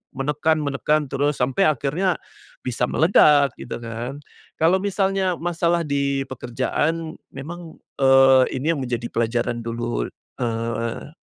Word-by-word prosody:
menekan 150 Hz, +3 st, +1 dB
menekan 150 Hz, +1 st, 0 dB
terus 145 Hz, +2 st, +1 dB
sampai 130 Hz, +10 st, +1 dB
akhirnya 155 Hz, +6 st, 0 dB, 0.5 s
bisa 125 Hz, -1 st, -2 dB
meledak, 150 Hz, -4 st, +5 dB
gitu -, -, -6 dB
kan. 115 Hz, +4 st, -5 dB, 0.4 s
Kalau 165 Hz, +3 st, +4 dB
misalnya 195 Hz, -1 st, 0 dB
masalah 170 Hz, 0 st, 0 dB
di 140 Hz, -1 st, 0 dB
pekerjaan 145 Hz, +6 st, -2 dB, 0.2 s
memang, 165 Hz, +4 st, -8 dB, 0.2 s
eee, 135 Hz, -1 st, +6 dB, 0.2 s
ini 155 Hz, +5 st, +1 dB
yang -, -, -4 dB
menjadi 120 Hz, -1 st, -3 dB
pelajaran 120 Hz, +1 st, -1 dB
dulu, 115 Hz, -, -3 dB, 0.3 s
eee, 115 Hz, +3 st, -3 dB
140 Hz, 115 wpm, -22 LUFS, 120-160 Hz, 0.5 s, eee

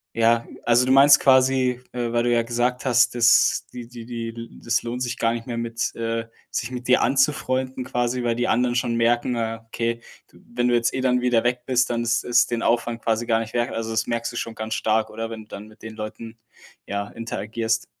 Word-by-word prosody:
ja. 115 Hz, 0 st, +3 dB, 0.2 s
Also, 120 Hz, +1 st, +3 dB
du 130 Hz, -, +1 dB
meinst 140 Hz, +2 st, +7 dB
quasi, 130 Hz, -1 st, +3 dB
äh, 120 Hz, -1 st, -3 dB
weil 120 Hz, 0 st, +1 dB
du 120 Hz, -, +1 dB
ja 115 Hz, -1 st, +3 dB
gesagt 120 Hz, +2 st, -1 dB
hast: 125 Hz, -1 st, +3 dB
„dass 120 Hz, 0 st, +4 dB
die 120 Hz, -2 st, -8 dB
die 120 Hz, -2 st, -10 dB
die 115 Hz, -1 st, -7 dB
das 120 Hz, 0 st, 0 dB
lohnt 120 Hz, +2 st, -4 dB
sich 125 Hz, 0 st, -2 dB
gar 115 Hz, 0 st, +1 dB
nicht 115 Hz, +1 st, -6 dB
mehr 120 Hz, -2 st, -4 dB
mit 115 Hz, 0 st, -2 dB
äh, 115 Hz, 0 st, -3 dB, 0.2 s
sich 120 Hz, -, -2 dB
mit 125 Hz, -1 st, -7 dB
dir 125 Hz, -, +4 dB
anzufreunden“ 130 Hz, -2 st, 0 dB
quasi, 125 Hz, 0 st, -1 dB
weil 115 Hz, -1 st, 0 dB
die 120 Hz, -, -1 dB
anderen 120 Hz, +1 st, +1 dB
schon 120 Hz, -1 st, 0 dB
merken: 120 Hz, +1 st, +1 dB
„Ah, 115 Hz, 0 st, -3 dB
okay, 115 Hz, +1 st, -2 dB, 0.3 s
du -, -, -21 dB, 0.2 s
wenn 120 Hz, 0 st, +1 dB
du 120 Hz, -, +3 dB
jetzt 120 Hz, 0 st, +1 dB
eh 130 Hz, -, -2 dB
dann 125 Hz, -1 st, +2 dB
wieder 125 Hz, -2 st, +2 dB
weg 125 Hz, 0 st, 0 dB
bist, 130 Hz, 0 st, +2 dB
dann 120 Hz, -1 st, -1 dB
ist 120 Hz, 0 st, 0 dB
es 120 Hz, -, +3 dB
den 115 Hz, -1 st, -3 dB
Aufwand 115 Hz, 0 st, 0 dB
quasi 115 Hz, +1 st, 0 dB
gar 115 Hz, -1 st, +2 dB
nicht 110 Hz, -1 st, -6 dB
wert“? 120 Hz, +1 st, 0 dB
Also, 115 Hz, 0 st, -4 dB
das 110 Hz, 0 st, 0 dB
merkst 115 Hz, 0 st, -2 dB
du -, -, -11 dB
schon 115 Hz, -, -4 dB
ganz 110 Hz, +1 st, -4 dB
stark, 110 Hz, 0 st, +1 dB
oder, 115 Hz, +1 st, -5 dB
wenn 110 Hz, -, -7 dB
du -, -, -23 dB
dann 105 Hz, 0 st, -9 dB
mit 110 Hz, -, -19 dB
den 110 Hz, -1 st, -9 dB
Leuten, 110 Hz, +1 st, -8 dB, 0.5 s
ja, 100 Hz, 0 st, -3 dB
interagierst? 115 Hz, 0 st, -3 dB
120 Hz, 230 wpm, -23 LUFS, 115-125 Hz, 0.5 s, meinst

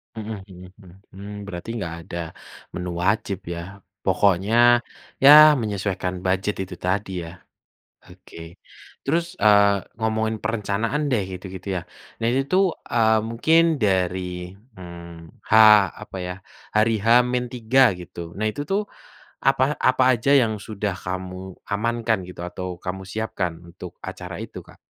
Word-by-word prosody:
Mhm 110 Hz, 0 st, -6 dB, 0.2 s
mhm 90 Hz, 0 st, -12 dB
mhm, 90 Hz, -, -15 dB, 0.2 s
hmm 100 Hz, +2 st, -9 dB, 0.2 s
berarti 90 Hz, +2 st, -7 dB
nggak 85 Hz, -4 st, -4 dB
ada 85 Hz, -1 st, -5 dB, 0.5 s
menu 90 Hz, 0 st, -4 dB
wajib 100 Hz, +1 st, 0 dB
ya, 85 Hz, +3 st, -7 dB, 0.2 s
pokoknya 105 Hz, +6 st, +3 dB, 0.4 s
ya 150 Hz, +2 st, +10 dB
menyesuaikan 100 Hz, -5 st, -3 dB
bujet 95 Hz, +2 st, -1 dB
itu 95 Hz, -1 st, -5 dB
tadi 95 Hz, 0 st, -2 dB
ya. 85 Hz, +2 st, -10 dB, 0.7 s
Oke. 85 Hz, +1 st, -13 dB, 0.5 s
Terus, 170 Hz, +5 st, -1 dB
eee, 100 Hz, -, +4 dB, 0.2 s
ngomongin 110 Hz, 0 st, -1 dB
perencanaan 115 Hz, +6 st, -1 dB
deh 115 Hz, -, +2 dB
gitu-gitu 95 Hz, 0 st, -8 dB
ya, -, -, -2 dB, 0.4 s
nah 115 Hz, -, 0 dB
ini 135 Hz, +2 st, +1 dB
tuh, 185 Hz, +2 st, +3 dB, 0.2 s
eee, 110 Hz, -2 st, +3 dB
mungkin 160 Hz, +8 st, +3 dB
dari, 90 Hz, -3 st, -1 dB, 0.2 s
mmm, 85 Hz, -2 st, -11 dB
H -, -, -11 dB, 0.5 s
apa -, -, -10 dB
ya, 90 Hz, 0 st, -4 dB, 0.4 s
hari 110 Hz, +1 st, +3 dB
H-3 125 Hz, 0 st, +3 dB
gitu 85 Hz, -1 st, -9 dB
nah 105 Hz, -, -2 dB
itu 145 Hz, +7 st, -4 dB
tuh 200 Hz, +2 st, 0 dB, 0.6 s
apa 135 Hz, +1 st, +3 dB
apa 130 Hz, 0 st, +3 dB
aja 120 Hz, +4 st, 0 dB
yang 110 Hz, -4 st, +1 dB
sudah 105 Hz, -2 st, -3 dB
kamu 95 Hz, 0 st, -6 dB, 0.2 s
amankan 115 Hz, 0 st, 0 dB
gitu, 90 Hz, -, -9 dB
atau 90 Hz, 0 st, -6 dB
kamu 95 Hz, +1 st, -5 dB
siapkan 95 Hz, -6 st, -3 dB
untuk 85 Hz, +1 st, -11 dB
acara -, -, -7 dB
itu -, -, -8 dB
Kak? -, -, -17 dB
100 Hz, 135 wpm, -23 LUFS, 90-115 Hz, 0.7 s, ya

